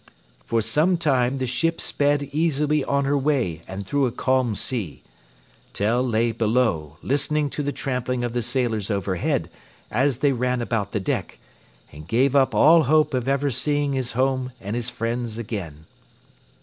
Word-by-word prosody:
For 115 Hz, -1 st, 0 dB
some 155 Hz, -, +2 dB
time 135 Hz, -5 st, +1 dB
the 130 Hz, -, -1 dB
ship 145 Hz, +7 st, 0 dB
sped 145 Hz, 0 st, +1 dB
easily 150 Hz, -1 st, +1 dB
on 140 Hz, 0 st, 0 dB
her 140 Hz, +1 st, +1 dB
way 130 Hz, -, 0 dB
and 95 Hz, +1 st, -6 dB
through 140 Hz, +5 st, +1 dB
a -, -, -3 dB
calm 130 Hz, -2 st, +1 dB
sea. 105 Hz, -, -3 dB, 0.7 s
Tell 110 Hz, +5 st, +1 dB
lay 115 Hz, -2 st, +1 dB
below, 110 Hz, -, 0 dB
listening 145 Hz, +1 st, 0 dB
to -, -, -3 dB
the 145 Hz, 0 st, -1 dB
trampling 125 Hz, -2 st, -2 dB
of 120 Hz, -1 st, -2 dB
the 120 Hz, -, 0 dB
sailors 115 Hz, -4 st, -1 dB
overhead, 100 Hz, -3 st, -1 dB, 0.4 s
as 130 Hz, +2 st, +1 dB
they 140 Hz, +2 st, +2 dB
ran 125 Hz, 0 st, 0 dB
about 115 Hz, -4 st, -2 dB
the 105 Hz, -, -1 dB
deck, 95 Hz, -, -3 dB, 0.5 s
and 75 Hz, +2 st, -11 dB
gave 130 Hz, +6 st, +2 dB
up 130 Hz, -4 st, +3 dB
all 160 Hz, +8 st, +6 dB
hope 155 Hz, +2 st, +3 dB
of 125 Hz, -1 st, -1 dB
ever 140 Hz, +1 st, +1 dB
seeing 145 Hz, +3 st, 0 dB
his 130 Hz, -2 st, -2 dB
home 130 Hz, 0 st, 0 dB
and 100 Hz, +2 st, -5 dB
his 120 Hz, 0 st, -3 dB
friends 120 Hz, -1 st, -3 dB
again. 95 Hz, -10 st, -6 dB
125 Hz, 165 wpm, -23 LUFS, 115-140 Hz, 0.7 s, all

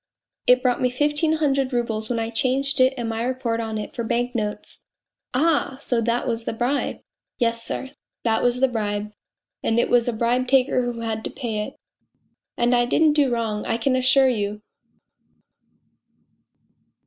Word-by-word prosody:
It 250 Hz, 0 st, +5 dB
brought 250 Hz, -2 st, +1 dB
me 250 Hz, -, +3 dB
fifteen 295 Hz, +4 st, +1 dB
hundred 275 Hz, -4 st, +1 dB
roubles 225 Hz, -3 st, -1 dB
when 240 Hz, -, -1 dB
I 225 Hz, 0 st, -2 dB
changed 270 Hz, +4 st, 0 dB
it 260 Hz, +1 st, +4 dB
and 240 Hz, -2 st, -3 dB
my 225 Hz, 0 st, -2 dB
report 245 Hz, -2 st, -1 dB
on 220 Hz, -1 st, -3 dB
it 210 Hz, -, -6 dB
for 235 Hz, -, -2 dB
bank 240 Hz, +2 st, -1 dB
notes! 210 Hz, -3 st, -5 dB
" -, -, -67 dB
" -, -, -66 dB
Ah, 285 Hz, -2 st, +1 dB
so 245 Hz, -4 st, 0 dB
that 235 Hz, +1 st, 0 dB
was 230 Hz, -1 st, -2 dB
the -, -, -2 dB
bribe! 245 Hz, +5 st, -1 dB
" -, -, -67 dB
" -, -, -68 dB
Yes, 230 Hz, -2 st, 0 dB
sir, 265 Hz, +3 st, -4 dB, 0.3 s
that 225 Hz, -1 st, +2 dB
was 245 Hz, +1 st, +1 dB
the 265 Hz, -, +5 dB
bribe 210 Hz, -3 st, -2 dB, 0.5 s
and 225 Hz, +1 st, +1 dB
it -, -, +1 dB
was 240 Hz, -1 st, +4 dB
a 245 Hz, -, 0 dB
bribe 240 Hz, +3 st, +1 dB
taker 260 Hz, 0 st, +3 dB
who 230 Hz, -1 st, -7 dB
had 220 Hz, -1 st, -3 dB
to -, -, -2 dB
pay 230 Hz, -5 st, -4 dB
it -, -, -12 dB, 0.8 s
and 240 Hz, +1 st, +2 dB
I 240 Hz, 0 st, +3 dB
didn't 305 Hz, +5 st, +3 dB
do 290 Hz, -4 st, +2 dB
wrong, 225 Hz, -3 st, -1 dB
I 225 Hz, -, 0 dB
can 255 Hz, +3 st, +1 dB
assure 260 Hz, +1 st, +4 dB
you 210 Hz, -3 st, -2 dB
240 Hz, 190 wpm, -23 LUFS, 225-260 Hz, 0.8 s, It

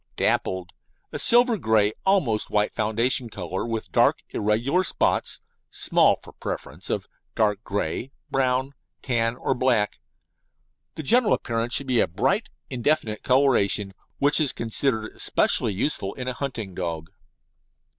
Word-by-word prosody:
Dappled: 95 Hz, -1 st, 0 dB, 0.4 s
A -, -, -5 dB
silver 240 Hz, -2 st, +5 dB
grey 110 Hz, -5 st, +3 dB
to -, -, -19 dB
almost 145 Hz, -, +2 dB
white 105 Hz, 0 st, +1 dB
foundation 115 Hz, +3 st, +1 dB
colour, 95 Hz, -2 st, -4 dB
with 115 Hz, -1 st, -4 dB
dark, -, -, +3 dB
irregular 115 Hz, -, +1 dB
spots -, -, 0 dB, 0.3 s
(small -, -, +3 dB
for -, -, -14 dB
preference) -, -, -6 dB
of -, -, -2 dB, 0.3 s
dark 105 Hz, -1 st, +1 dB
grey, 100 Hz, +5 st, -3 dB, 0.2 s
brown, 130 Hz, +1 st, 0 dB, 0.3 s
tan, 115 Hz, -2 st, 0 dB
or 135 Hz, -, -1 dB
black. 125 Hz, -5 st, +1 dB, 1.0 s
The 155 Hz, -, -6 dB
general 235 Hz, -, +4 dB
appearance 115 Hz, +1 st, -2 dB
should 140 Hz, -, 0 dB
be 125 Hz, -3 st, +1 dB
a -, -, +3 dB
bright, 130 Hz, -, 0 dB, 0.2 s
indefinite 125 Hz, -3 st, 0 dB
coloration, 120 Hz, -7 st, +2 dB, 0.2 s
which 145 Hz, +3 st, +3 dB
is 145 Hz, -, +1 dB
considered 115 Hz, -1 st, -1 dB
especially 110 Hz, -, +2 dB
useful 100 Hz, -2 st, -1 dB
in 130 Hz, -1 st, -6 dB
a 130 Hz, -, -1 dB
hunting 115 Hz, -8 st, -5 dB
dog. 85 Hz, -2 st, -5 dB
115 Hz, 135 wpm, -24 LUFS, 105-135 Hz, 1.0 s, silver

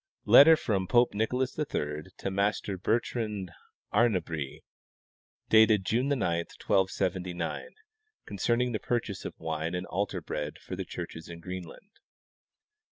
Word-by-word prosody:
Letter 160 Hz, +3 st, +9 dB
from 95 Hz, -9 st, -1 dB
Pope 120 Hz, +4 st, +4 dB
Nicolas 125 Hz, +6 st, -1 dB
III 75 Hz, -, -2 dB
to 95 Hz, -, -3 dB
Master 100 Hz, 0 st, 0 dB
Bertrand 105 Hz, -1 st, -1 dB, 0.4 s
Arnabrie, 90 Hz, -, 0 dB, 0.8 s
dated 110 Hz, -3 st, +5 dB
June 120 Hz, +6 st, +1 dB
9, 140 Hz, -1 st, +1 dB
1279, 90 Hz, -1 st, -1 dB, 0.5 s
concerning 120 Hz, +5 st, 0 dB
the 110 Hz, -, -2 dB
purchase 115 Hz, -5 st, -2 dB
of -, -, -7 dB
wine 80 Hz, +1 st, -3 dB
and 90 Hz, +1 st, -3 dB
altar 100 Hz, +3 st, -2 dB
bread -, -, -5 dB
for -, -, -7 dB
the -, -, -4 dB
churches 80 Hz, +1 st, -7 dB
in 85 Hz, 0 st, -8 dB
Greenland. 90 Hz, -, -8 dB
100 Hz, 120 wpm, -29 LUFS, 90-115 Hz, 0.8 s, Letter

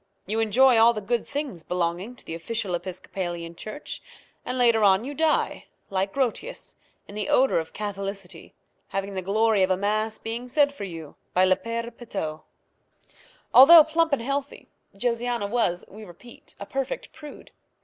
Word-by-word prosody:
You 215 Hz, +4 st, -2 dB
enjoy 230 Hz, +3 st, +5 dB
all 230 Hz, +1 st, +6 dB
the 215 Hz, -, -4 dB
good 230 Hz, +4 st, -2 dB
things 285 Hz, -, -4 dB
belonging 180 Hz, +7 st, -2 dB
to -, -, -15 dB
the -, -, -6 dB
official 195 Hz, +3 st, -3 dB
Episcopalian 175 Hz, -1 st, -5 dB
church, 215 Hz, -, -7 dB, 0.4 s
and 255 Hz, -, -4 dB
later 235 Hz, -3 st, +4 dB
on 195 Hz, +1 st, +5 dB
you 285 Hz, -, -5 dB
die, 315 Hz, +2 st, 0 dB, 0.3 s
like 195 Hz, +1 st, -1 dB
Grotius, 275 Hz, -, -3 dB, 0.3 s
in -, -, -11 dB
the 210 Hz, -1 st, -3 dB
odour 265 Hz, -8 st, +4 dB
of 160 Hz, -, -6 dB
Catholicity, 195 Hz, -4 st, -6 dB, 0.3 s
having 195 Hz, +1 st, -4 dB
the 190 Hz, -, -3 dB
glory 215 Hz, +2 st, +2 dB
of 185 Hz, -, +3 dB
a 185 Hz, -, +2 dB
mass 215 Hz, +2 st, -1 dB
being 230 Hz, +2 st, -5 dB
said 285 Hz, +2 st, +2 dB
for 205 Hz, -8 st, -6 dB
you 165 Hz, -5 st, -9 dB, 0.2 s
by 185 Hz, +1 st, +5 dB
le 185 Hz, 0 st, +4 dB
Père 230 Hz, +4 st, -5 dB
Petau. 160 Hz, -10 st, -5 dB, 1.1 s
Although 310 Hz, +5 st, +10 dB
plump 325 Hz, +1 st, +1 dB
and 270 Hz, -5 st, 0 dB
healthy, 275 Hz, +2 st, -4 dB, 0.3 s
Josiana 240 Hz, -1 st, -1 dB
was, 200 Hz, -5 st, 0 dB
we 215 Hz, +3 st, -12 dB
repeat, 210 Hz, +5 st, -15 dB
a 200 Hz, -, -6 dB
perfect 270 Hz, -, -4 dB
prude. 300 Hz, -1 st, -12 dB
215 Hz, 165 wpm, -25 LUFS, 190-245 Hz, 1.1 s, Although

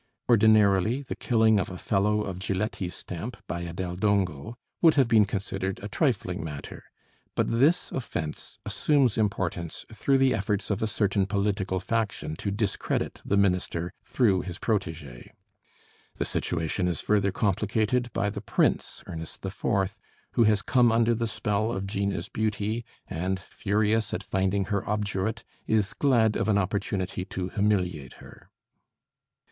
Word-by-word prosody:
Ordinarily 110 Hz, +1 st, +4 dB
the 135 Hz, -, -5 dB
killing 110 Hz, -3 st, +3 dB
of 95 Hz, -, -2 dB
a 90 Hz, -, -7 dB
fellow 105 Hz, +3 st, +1 dB
of 95 Hz, -3 st, -5 dB
Giletti's 95 Hz, -1 st, -2 dB
stamp 110 Hz, +8 st, -6 dB
by 85 Hz, 0 st, -4 dB
a 85 Hz, -1 st, -5 dB
Del 90 Hz, 0 st, -4 dB
Dongo 100 Hz, -1 st, 0 dB, 0.3 s
would 165 Hz, -2 st, +6 dB
have 135 Hz, -4 st, +4 dB
been 110 Hz, -3 st, +5 dB
considered 95 Hz, -1 st, -3 dB
a -, -, -3 dB
trifling 105 Hz, -, 0 dB
matter; 75 Hz, -3 st, -7 dB, 0.5 s
but -, -, +1 dB
this 140 Hz, +10 st, +3 dB
offense 80 Hz, -, -5 dB
assumes 140 Hz, -7 st, +2 dB
importance 95 Hz, -6 st, -2 dB
through 135 Hz, +5 st, +2 dB
the 135 Hz, -1 st, +4 dB
efforts 105 Hz, 0 st, -1 dB
of 100 Hz, -, -1 dB
a 110 Hz, -, +1 dB
certain 100 Hz, -2 st, +1 dB
political 100 Hz, -2 st, 0 dB
faction 105 Hz, -5 st, -2 dB
to 100 Hz, -, -3 dB
discredit 100 Hz, 0 st, -2 dB
the 100 Hz, -, +1 dB
minister 90 Hz, -3 st, +1 dB
through 100 Hz, -8 st, +2 dB
his 90 Hz, -2 st, -6 dB
protégé. 80 Hz, -, -3 dB, 0.8 s
The -, -, -2 dB
situation 85 Hz, +2 st, -1 dB
is 85 Hz, -4 st, 0 dB
further 100 Hz, -2 st, +2 dB
complicated 110 Hz, +5 st, 0 dB
by 105 Hz, 0 st, 0 dB
the 100 Hz, -1 st, -5 dB
Prince, -, -, 0 dB
Ernest 80 Hz, +3 st, -7 dB
IV., 95 Hz, 0 st, -1 dB, 0.3 s
who 115 Hz, -, +4 dB
has 105 Hz, -1 st, +3 dB
come 120 Hz, -2 st, +4 dB
under 115 Hz, +1 st, +3 dB
the 115 Hz, 0 st, -1 dB
spell 110 Hz, 0 st, -1 dB
of 95 Hz, -3 st, -3 dB
Gina's 100 Hz, -2 st, -2 dB
beauty, 110 Hz, +2 st, -2 dB, 0.2 s
and 95 Hz, +1 st, -2 dB
furious 105 Hz, +3 st, 0 dB
at -, -, -4 dB
finding 95 Hz, +1 st, 0 dB
her 100 Hz, -, +1 dB
obdurate, 105 Hz, 0 st, -1 dB, 0.2 s
is 105 Hz, -2 st, +1 dB
glad 115 Hz, -6 st, +3 dB
of -, -, 0 dB
an 105 Hz, -, +4 dB
opportunity 95 Hz, -2 st, -1 dB
to 90 Hz, -1 st, -4 dB
humiliate 90 Hz, -10 st, 0 dB
her. -, -, -15 dB
100 Hz, 150 wpm, -27 LUFS, 95-110 Hz, 0.8 s, would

